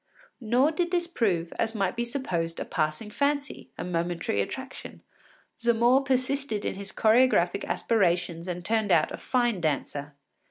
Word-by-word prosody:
Nor 250 +5 +3
did 345 +2 -1
this 350 -1 +1
prove, 190 - -1
as 225 - 0
might 195 -1 0
be 235 - -1
supposed, 180 -10 -2
a - - -3
passing 155 +7 -2
fancy, 285 +3 -1
a - - -4
momentary 170 - -1
attraction; 265 - -7 0.6
Zamore 235 +3 +3
persisted 265 -4 0
in - - -1
his 195 0 -6
choregraphic 220 -5 +3
aspirations 175 -5 0
and 175 -1 -5
turned 220 -1 +1
out 155 -3 +4
a - - -5
fine 240 -7 0
dancer. 145 -1 -2
220 Hz, 150 wpm, -27 LUFS, 175-255 Hz, 0.6 s, out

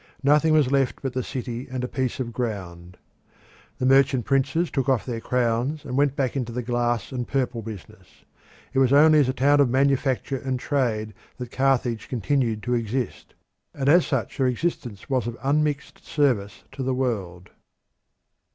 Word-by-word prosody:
Nothing 150 +3 +4
was 150 -4 +3
left 135 -1 0
but 135 -2 -2
the 130 - -1
city 125 -1 -5
and 130 0 -4
a - - -1
piece 130 -1 -2
of 120 -2 -4
ground. 90 -7 -5 0.8
The 130 - -1
merchant 135 -2 +4
princes 140 +5 +1
took 135 -1 -1
off 130 -5 +1
their 115 -3 -4
crowns 125 +5 -1
and 125 -2 -4
went 140 0 +2
back 135 -3 -1
into 125 -3 -2
the 125 +1 -3
glass 120 -1 -1
and 125 -2 -4
purple 130 -4 -1
business. 105 -6 -10 0.7
It 135 - +2
was 130 -1 +4
only 155 +2 +6
as 135 -3 +3
a - - 0
town 140 +3 +3
of 140 -3 +4
manufacture 135 0 +1
and 130 -1 -3
trade 115 -7 -1 0.2
that 125 -2 -7
Carthage 130 -4 0
continued 120 -3 0
to 125 - -1
exist, 120 +1 -3 0.4
and 135 -1 -2
as 170 +4 +5
such 130 -8 -2
her 130 - +2
existence 125 - -3
was 130 -4 0
of 120 0 -5
unmixed 145 0 -1
service 120 -9 0
to 135 - -7
the 130 0 0
world. 100 -9 -3
130 Hz, 175 wpm, -24 LUFS, 120-140 Hz, 0.8 s, only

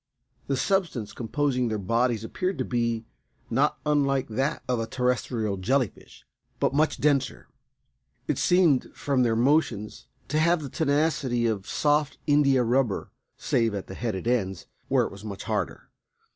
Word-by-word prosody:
The 135 - 0
substance 170 - 0
composing 125 +1 0
their 110 -1 -1
bodies 115 +3 0
appeared 185 +11 -2
to 130 - -1
be 115 -2 -1 0.5
not 135 +6 +2
unlike 140 -3 +1
that 130 +6 -1
of 125 -2 0
a 115 - -2
terrestrial 120 -4 -1
jelly 125 +5 +1
fish, - - -18 0.3
but - - +1
much 155 +2 +1
denser. 145 -2 0 0.8
It - - 0
seemed 175 -7 +3
from 140 -3 0
their 115 -2 +2
motions 115 - +1 0.2
to 155 - +1
have 170 0 +3
the 140 - -5
tenacity 145 -5 +1
of 105 -4 -1
soft 150 0 +1
indiarubber 135 -5 +2 0.3
save 115 -3 +1
at 100 - -4
the - - -9
headed 110 -1 -3
ends, 95 -7 0 0.2
where - - +3
it - - -6
was 100 +1 -11
much 100 -2 -6
harder. - - -3
125 Hz, 150 wpm, -26 LUFS, 115-145 Hz, 0.8 s, seemed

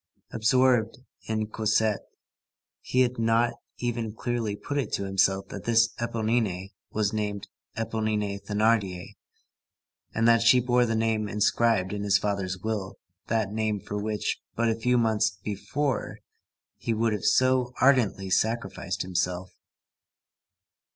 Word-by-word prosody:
Absorbed 120 0 +2 0.3
in 110 -1 -1
Cosette, 110 -1 0 0.7
he 130 - +1
had 125 -1 +1
not 115 +1 +2 0.2
even 115 -3 -3
clearly 115 -3 -2
put 145 +7 -3
it 140 - -3
to - - 0
himself 95 0 +1
that - - -8
this 115 0 +4
Éponine 110 -5 -1 0.2
was 105 -1 -1
named 105 -2 -3 0.3
Éponine 110 -3 -1
Thénardier, 105 -4 0 1.0
and 115 +1 +1
that 115 0 +5
she 115 +2 +6
bore 125 0 +2
the 115 - 0
name 110 -1 0
inscribed 105 -1 +2
in 105 - -3
his 100 -1 +3
father's 100 -2 -2
will, 105 0 -4 0.3
that 110 -3 0
name, 110 -1 -1
for 105 - -7
which, 105 0 -2
but 115 0 +1
a - - +2
few 125 +2 +1
months 110 -4 +1
before, 130 +5 -2 0.6
he 115 - -2
would 115 0 +1
have 105 - -3
so 130 -1 +3
ardently 115 -8 +3
sacrificed 115 +4 -1
himself. 90 0 -2
110 Hz, 130 wpm, -27 LUFS, 100-115 Hz, 1.0 s, she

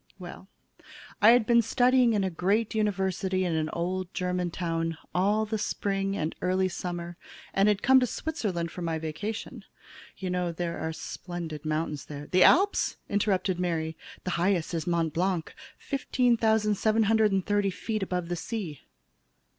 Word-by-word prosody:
"Well, 185 0 -10 0.7
I 210 - +8
had 240 -1 +6
been 235 +1 +5
studying 245 +1 +3
in 205 -2 +1
a 190 - -1
great 200 +6 0
university 190 -3 0
in 175 - 0
an 160 -1 0
old 180 +2 -3
German 180 -1 -1
town 165 -1 -2 0.2
all 205 +4 +2
the 215 0 -3
spring 195 -1 -1
and 155 +1 -2
early 185 +1 +2
summer 175 -1 -5 0.4
and 195 +1 +3
had 205 -1 +2
come 265 +1 +7
to 250 - +1
Switzerland 195 - -3
for 180 - -7
my 165 -1 -1
vacation. 160 +8 -5 0.5
You 185 -2 -4
know 180 -1 -1
there 170 0 -4
are 160 0 -2
splendid 165 -2 -6
mountains 155 -1 -2
there 145 0 -8
" - - -25
"The 185 - +4
Alps," 395 +3 +4
interrupted 190 -3 +1
Mary. 165 -3 -1 0.3
"The 185 - -2
highest 180 -3 +1
is 165 -1 -2
Mt. 165 -3 0
Blanc, 180 -1 -1 0.2
15,730 220 -5 +2
feet 215 +3 -3
above 180 -2 -2
the 175 - -1
sea." 175 - -5
185 Hz, 155 wpm, -28 LUFS, 170-215 Hz, 0.7 s, I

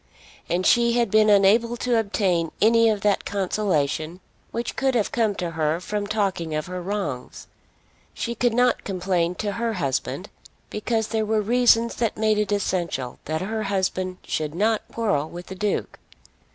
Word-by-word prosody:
And 180 +2 0
she 235 -1 +4
had 235 -4 +1
been 215 0 +5
unable 215 +4 +4
to 240 -1 +1
obtain 185 -6 0
any 230 +1 +5
of 210 -2 0
that 205 -1 +2
consolation 180 -5 -1 0.3
which 235 +1 -4
could 265 -1 +1
have 220 -4 +1
come 225 -6 +1
to 175 -3 -3
her 160 0 0
from 205 +3 -3
talking 190 -7 -1
of 155 - -2
her 180 0 -5
wrongs. 175 -10 -4 0.7
She 235 - -3
could 235 0 +1
not 245 0 +2
complain 180 -2 -1
to 205 +1 -2
her 230 +2 -2
husband, 140 0 -2 0.4
because 220 +1 -1
there 220 -1 0
were 215 0 +1
reasons 235 0 +4
that 230 -2 -1
made 215 -1 +2
it 210 -1 -1
essential 175 -10 -2
that 155 +1 -2
her 220 +3 -2
husband 190 -2 -1
should 155 0 -2
not 215 +3 +2
quarrel 200 -10 0
with 175 +1 -8
the - - -8
Duke. 205 +2 -2
205 Hz, 165 wpm, -24 LUFS, 175-225 Hz, 0.7 s, been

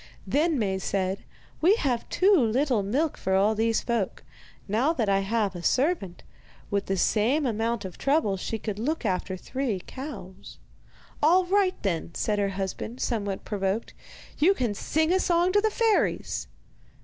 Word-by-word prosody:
Then 310 +1 +1
Maie 195 -5 0
said: 190 0 -2 0.4
'We 365 +6 +6
have 255 - -1
too 390 +2 +4
little 250 - +2
milk 270 +11 0
for 190 0 0
all 200 +3 +4
these 225 +1 +1
folk. 230 -6 -2 0.4
Now 235 +10 +2
that 230 -10 0
I 195 0 +3
have 205 0 0
a 175 - -6
servant, 250 - 0 0.5
with 200 -1 0
the 195 - 0
same 235 - +2
amount 225 -2 -1
of 185 - -8
trouble 275 -8 +2
she 210 +4 -3
could 210 -1 -5
look 285 +3 -2
after 185 -1 -1
three 250 -1 -3
cows.' 200 -9 -9 0.6
'All 355 +5 +5
right, 380 0 +2
then,' 170 -4 -2
said 210 -1 0
her 200 -1 +1
husband, 195 +5 -4
somewhat 205 -5 -2
provoked, 200 +1 -2 0.5
'you 375 +6 +5
can 240 - -1
sing 315 - 0
a 375 - +3
song 350 0 +2
to 410 +2 +3
the 440 - +2
fairies. 445 0 0
225 Hz, 160 wpm, -26 LUFS, 195-305 Hz, 0.6 s, We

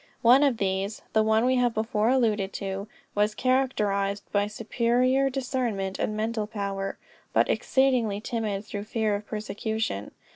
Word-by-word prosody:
One 245 +4 +7
of 275 -5 +3
these 195 +1 -2
(the 220 - +4
one 220 +2 +3
we 255 0 +3
have 245 -2 +2
before 220 0 +1
alluded 220 -6 +1
to) 195 +1 -4 0.3
was 210 +1 +1
characterized 205 -6 +1
by 205 0 +2
superior 245 +5 +1
discernment 245 -7 -2
and 215 - -1
mental 220 -1 -1
power, 200 -2 -3 0.4
but - - +4
exceedingly 250 -6 +2
timid 215 -3 -3
through 205 0 -5
fear 220 -1 0
of 205 +1 -4
persecution. 215 - -3
215 Hz, 145 wpm, -27 LUFS, 205-245 Hz, 0.4 s, One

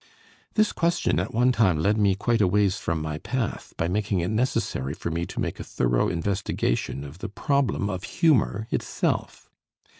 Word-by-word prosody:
This 215 -1 +3
question 170 - +1
at 90 - -2
one 125 +3 +3
time 105 -9 +3
led 100 +7 +2
me 100 -3 +3
quite 115 +3 +1
a 95 - +5
ways 100 +1 +2
from 80 -2 -2
my 75 0 -3
path, 125 +2 -3
by 80 - 0
making 100 +1 0
it 85 - -1
necessary 110 - -1
for 85 - -4
me 85 +1 -2
to - - -6
make - - -2
a - - -4
thorough - - +1
investigation 85 -7 -1
of 70 +5 -10
the 110 - -5
problem 140 -2 0
of 95 -3 -4
humor 120 - +2
itself. - - -2
100 Hz, 180 wpm, -25 LUFS, 85-115 Hz, -, a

